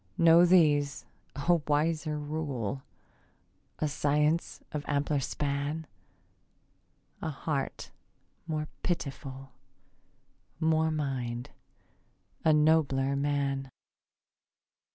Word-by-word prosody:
No, 170 +1 +7
these: 150 -5 +3 0.3
a 170 +4 +2
wiser 155 +1 +1
rule; 145 -5 -3 1.0
A 155 - 0
science 150 +3 0
of 150 -1 -3
ampler 145 0 +1
span; 145 +3 -2 1.4
A - - -2
heart 145 -1 -3 0.6
more 155 -1 -2
pitiful; 135 -5 -4 1.1
More 160 -1 +3
mind; 130 -6 -3 0.9
a 160 - +5
nobler 150 -3 +3
man. 140 -1 -1
145 Hz, 75 wpm, -30 LUFS, 140-160 Hz, 1.4 s, No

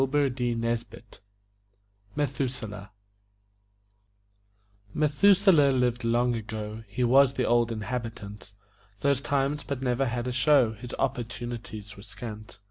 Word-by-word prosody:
METHUSELAH 125 -8 -3 2.1
Methuselah 155 0 +5
lived 125 -1 +1
long 120 +1 +2
ago 110 -1 -5
He 125 +5 -2
was 135 +2 +5
the 125 - 0
Old 120 0 +2
Inhabitant 110 -3 -6 0.5
Those 140 -1 +2
times, 140 +3 0
but 135 -2 -4
never 130 +1 +1
had 120 +1 -2
a - - -1
show; 125 -1 +4
His 120 +3 -8
opportunities 120 -4 -4
were - - -10
scant. 105 0 -9
120 Hz, 100 wpm, -27 LUFS, 110-135 Hz, 2.1 s, Methuselah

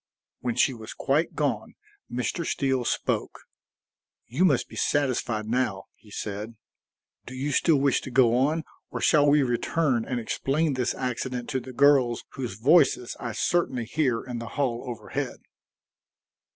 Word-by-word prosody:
When 120 -2 -2
she 130 - +3
was 110 -2 -9
quite 145 +4 0
gone, - - -1 0.4
Mr. 125 +7 -2
Steele 135 -5 0
spoke: - - -1 0.8
"You 145 +11 +1
must 140 -8 +2
be - - -12
satisfied 125 -6 0
now," 110 -4 -1
he 105 - -21
said. 105 +2 -5 0.7
"Do 130 - -7
you 140 +3 -2
still 160 +3 +3
wish 135 -2 +2
to - - -7
go 120 -2 +4
on, 150 +6 +1 0.3
or - - -5
shall 145 -2 +4
we 145 0 +5
return 125 +1 +1
and 125 -2 -2
explain 140 +6 0
this 125 -2 -1
accident 125 -1 -3
to 135 -2 0
the 130 +1 -9
girls 130 -3 +4
whose 125 -8 -5
voices 130 - +3
I 115 -3 -4
certainly 130 -2 0
hear 125 -2 0
in 125 -2 -5
the 115 - -6
hall 125 -5 0
overhead?" 120 - -4
130 Hz, 150 wpm, -26 LUFS, 120-140 Hz, 0.8 s, we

